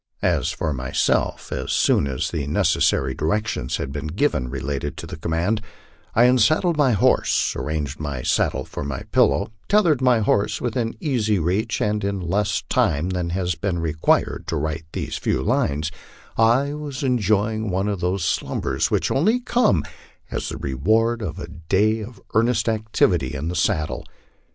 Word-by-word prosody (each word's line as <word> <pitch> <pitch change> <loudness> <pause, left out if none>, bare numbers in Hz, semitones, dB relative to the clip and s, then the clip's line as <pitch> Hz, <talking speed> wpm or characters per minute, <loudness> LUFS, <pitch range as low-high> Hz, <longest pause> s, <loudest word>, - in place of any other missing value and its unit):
As - - +2
for 80 - -2
myself, 65 -1 0
as - - -3
soon - - +3
as 65 -2 -2
the 75 -5 -3
necessary 65 -2 +2
direc 85 +11 0
tions 60 - -2
had 65 - -4
been 75 +2 -4
given 75 - 0
relating 70 +2 -3
to - - -7
the - - -7
command, 85 +7 -1 0.5
I 115 - +6
unsaddled 140 - +4
my 140 -5 +3
horse, 100 - +2
arranged 75 -2 -3
my 70 -5 -4
saddle - - +1
for - - -6
my 70 -2 -4
pillow, - - +3 0.2
tethered 175 -10 +4
my 125 -3 +4
horse 100 -1 +1
within 115 -2 -2
easy 115 -8 +1
reach, 95 +7 0
and 105 0 0
in 100 0 -1
less 100 +3 0
time 75 +6 +1
than 90 -2 -2
has 90 0 -1
been 85 +2 -2
required 80 -2 +1
to - - -2
write 80 +1 -3
these - - -3
few - - -1
lines, 75 +2 0 0.4
I 120 +6 +3
was 145 -3 -5
enjoying 110 -3 +1
one 95 +2 0
of 100 -3 -2
those 90 0 -1
slumbers - - -1
which - - 0
only 215 - +3
come 240 - +2 0.5
as - - -3
the - - -5
reward 110 - +1
of 90 -4 -4
a 85 -2 -6
day 95 +7 +1
of 110 0 -9
earnest 120 +3 +2
activity 105 - +1
in 75 +5 -3
the 90 - -3
saddle. 80 -2 -1
95 Hz, 165 wpm, -22 LUFS, 80-115 Hz, 0.5 s, I